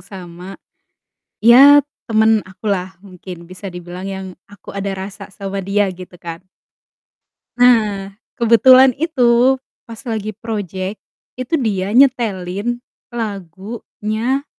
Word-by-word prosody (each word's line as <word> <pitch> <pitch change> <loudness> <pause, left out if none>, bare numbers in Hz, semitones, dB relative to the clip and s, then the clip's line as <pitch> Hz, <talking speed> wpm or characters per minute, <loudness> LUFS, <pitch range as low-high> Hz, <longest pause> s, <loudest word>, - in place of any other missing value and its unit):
sama 180 0 -10 0.9
iya, 275 +5 +8 0.2
temen 220 -1 +3
akulah 190 -1 -3
mungkin 180 -3 -11
bisa 185 +2 -9
dibilang 180 +1 -8
yang 190 -1 -5 0.2
aku 205 0 -12
ada 200 0 -3
rasa 195 +1 -8
sama 195 0 -5
dia 200 +2 +1
gitu 180 0 -12
kan. 170 -1 -8 1.2
Nah, 215 -5 +3 0.2
kebetulan 255 +3 +6
itu 255 -5 +3 0.3
pas 230 -1 -10
lagi 215 -4 -4
projek, 200 -2 -5 0.4
itu 255 +5 -3
dia 205 -8 -1
nyetelin 235 -3 +1 0.3
lagunya 215 - -4
205 Hz, 105 wpm, -18 LUFS, 190-235 Hz, 1.2 s, iya